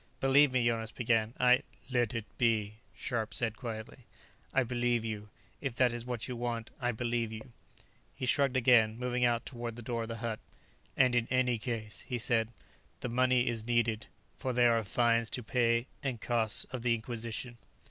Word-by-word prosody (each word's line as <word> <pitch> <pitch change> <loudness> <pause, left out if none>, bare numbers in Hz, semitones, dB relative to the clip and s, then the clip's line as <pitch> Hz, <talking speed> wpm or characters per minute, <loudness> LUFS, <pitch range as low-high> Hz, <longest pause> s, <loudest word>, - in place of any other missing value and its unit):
"Believe 135 +1 +5
me," 125 -2 +2
Jonas 115 -1 0
began. 115 -2 +1
"I 125 0 +5
" - - -19
"Let 120 -2 +1
it 115 -2 -2
be," 110 -3 +2 0.2
Scharpe 110 -1 -2
said 115 -1 0
quietly. 115 -1 -6 0.5
"I 135 - +3
believe 120 -1 0
you. 105 -1 -5 0.3
If 135 -4 -3
that 125 -2 +3
is 120 0 -4
what 120 -3 -3
you 125 - -4
want, 120 -1 -3
I 120 0 +1
believe 120 0 -1
you." 110 +3 -8 0.6
He - - -3
shrugged 135 0 +2
again, 115 -3 +5
moving 125 0 0
out 120 -1 +1
toward 120 -3 -5
the 120 - -9
door 115 0 -2
of 115 - -4
the 115 0 -5
hut. 110 -2 -2 0.6
"And, 130 -2 +5
in 120 -1 +2
any 125 -2 +2
case," 110 -3 -4
he 125 - -2
said, 115 -1 +2 0.5
"the 125 - -2
money 125 +1 +3
is 115 -2 -1
needed. 115 -2 +1 0.3
For 130 - -2
there 120 -1 +5
are 115 - +1
fines 115 +1 +2
to 125 - -3
pay, 115 +1 +2 0.2
and 130 -4 -2
costs 115 -1 +1
of 130 - -4
the 120 -1 +2
Inquisition." 115 +1 -4
120 Hz, 190 wpm, -32 LUFS, 115-125 Hz, 0.6 s, Believe